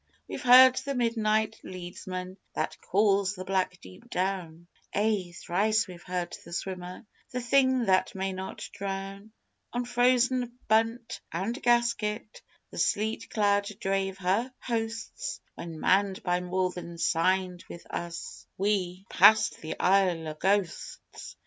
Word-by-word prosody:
We've - - -6
heard 255 +1 +8
the 275 +1 -2
Midnight 220 -2 +1
Leadsman 185 +1 -7 0.2
That - - -2
calls 200 0 +2
the 185 -1 -7
black 185 -1 0
deep 95 0 -14
down 180 -3 -2 0.3
Ay, 205 -4 +1
thrice 215 +6 +1
we've 180 -2 -10
heard 180 -1 -3
The 170 - -11
Swimmer, 180 +2 -5 0.2
The 250 - -3
Thing 260 0 +3
that 190 -1 +2
may 190 0 -2
not 190 0 -6
drown. 195 +1 -5 0.4
On 245 0 -2
frozen 245 0 +2
bunt 225 +2 +1
and 200 - -3
gasket 235 -3 +1 0.3
The - - -7
sleet 215 +2 0
cloud 205 -1 +2
drave 195 -1 -1
her 195 +7 0
hosts, 225 -2 -4
When, 165 -2 -8
manned 195 +2 +2
by 180 -1 +1
more 180 +1 -1
than 170 -1 -8
signed 180 +2 +1
with 170 - -9
us, 170 -1 -6
We 190 -2 -1
passed 220 0 +5
the 160 - -6
Isle 180 -4 +2
o' - - -4
Ghosts! 190 +2 -2
195 Hz, 135 wpm, -28 LUFS, 180-225 Hz, 0.4 s, heard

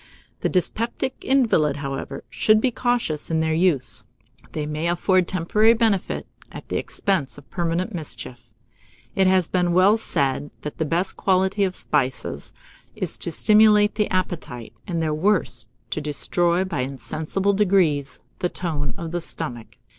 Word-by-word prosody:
The - - 0
dyspeptic 230 +7 -1
invalid, 210 - +2
however, 135 -1 -5
should 215 - +3
be 250 +3 +1
cautious 235 - -1
in 160 -1 +1
their 160 0 +1
use; 160 -10 +2 0.5
they 150 -1 -2
may 150 +2 -2
afford 180 +1 +2
temporary 210 +6 +3
benefit, 220 -5 0 0.3
at - - -10
the - - -1
expense 190 -9 -1
of 145 - -14
permanent 175 +4 -1
mischief. 120 -7 -5 0.6
It 190 -1 +3
has 185 -3 +3
been 180 -1 +1
well 190 +5 +5
said, 140 -8 -1
that 150 - -6
the 160 - +1
best 170 +5 -1
quality 190 +1 +2
of 185 -1 -1
spices 130 -1 -1 0.4
is - - -3
to 170 - -3
stimulate 210 +2 +5
the 210 -1 0
appetite, 165 -10 -3
and 170 -3 -1
their 155 -1 0
worst 185 +5 +1 0.2
to 155 - -2
destroy, 170 +4 +1
by 185 -5 -4
insensible 155 +9 -1
degrees, 175 -9 +1 0.2
the 180 - 0
tone 155 -6 -3
of 165 -1 -6
the 175 0 -2
stomach. 120 -9 -5
175 Hz, 150 wpm, -23 LUFS, 150-195 Hz, 0.6 s, well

